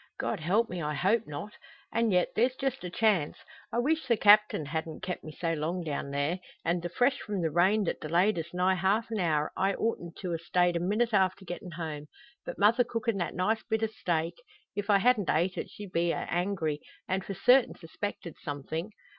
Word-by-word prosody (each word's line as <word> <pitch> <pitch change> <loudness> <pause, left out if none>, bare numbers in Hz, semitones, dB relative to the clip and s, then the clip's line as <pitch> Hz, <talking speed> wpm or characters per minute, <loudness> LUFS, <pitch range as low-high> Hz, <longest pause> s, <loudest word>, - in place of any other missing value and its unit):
God - - -1
help 200 +9 +2
me, 180 -4 -5
I 150 -1 -2
hope 205 +9 +2
not! 150 +8 -6 0.4
An' 230 0 +2
yet 180 -3 +3
there's 250 +3 +2
just 265 -3 -2
a 180 - -4
chance. 195 -6 +1 0.3
I - - -2
weesh 315 +6 +1
the 235 -3 +3
Captain 210 -6 +5
hadn't 160 +2 -4
kep' 185 -1 -4
me 155 - -7
so 165 +2 -2
long 165 +3 -2
down 145 -3 -3
there. 145 +6 -1 0.3
An' 175 +1 +1
the 175 +1 -4
fresh 245 +9 +2
from 200 -4 -3
the 160 - 0
rain 190 +6 +3
that 180 - -2
delayed 175 +5 +2
us 165 +1 -6
nigh 180 +1 +2
half 195 +5 +1
a - - -1
hour, 155 -3 +1
I 195 +1 +1
oughtn't 175 -7 -2
to 180 -3 -2
a 165 - -2
stayed 175 +1 +2
a - - +1
minute 215 +6 0
after 190 -1 +2
gettin' 175 0 -7
home. 155 -3 -5 0.4
But - - -5
mother 220 +5 +5
cookin' 230 -2 -2
that 175 - -2
nice 215 +5 +1
bit 220 -1 -1
o' - - +3
steak; 165 -3 -1 0.4
if 205 +1 -3
I 200 - +6
hadn't 220 -1 +3
ate 175 +4 +2
it - - -4
she'd 205 -2 -9
a - - -28
been 170 0 +1
angry, 175 -4 -1 0.3
and 190 0 -1
for 195 +2 -5
certain 250 +6 +4
suspected 170 0 -6
somethin'. 155 +6 -4
185 Hz, 215 wpm, -29 LUFS, 165-215 Hz, 0.4 s, I